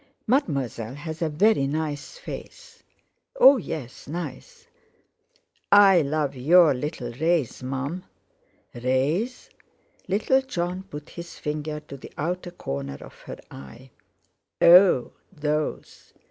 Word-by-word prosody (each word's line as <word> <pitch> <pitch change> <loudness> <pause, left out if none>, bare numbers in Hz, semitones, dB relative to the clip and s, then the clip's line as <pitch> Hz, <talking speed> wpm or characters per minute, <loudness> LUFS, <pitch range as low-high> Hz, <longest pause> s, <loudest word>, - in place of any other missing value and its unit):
"Mademoiselle 135 - -1
has 160 +2 -7
a 165 - +1
very 155 -1 +3
nice 150 - -4
face." - - -10 0.6
"Oh! 280 - +8
yes; 155 - -7
nice. 315 - -7 1.1
I 195 -3 +7
love 145 -1 -1
your 155 +4 +5
little 125 -2 -4
rays, 160 +1 0
Mum." 135 +7 -4 0.7
"Rays?" 135 - -1 0.6
Little 215 +8 +2
Jon 180 -7 -3
put 150 -6 -10
his 170 0 -9
finger 150 0 -4
to 145 -2 -10
the - - -12
outer 175 +4 -3
corner 70 - -5
of - - -12
her - - -9
eye. 115 - -12 0.7
"Oh! 175 -6 +6 0.2
Those? 150 -3 -4
155 Hz, 110 wpm, -25 LUFS, 135-180 Hz, 1.1 s, Oh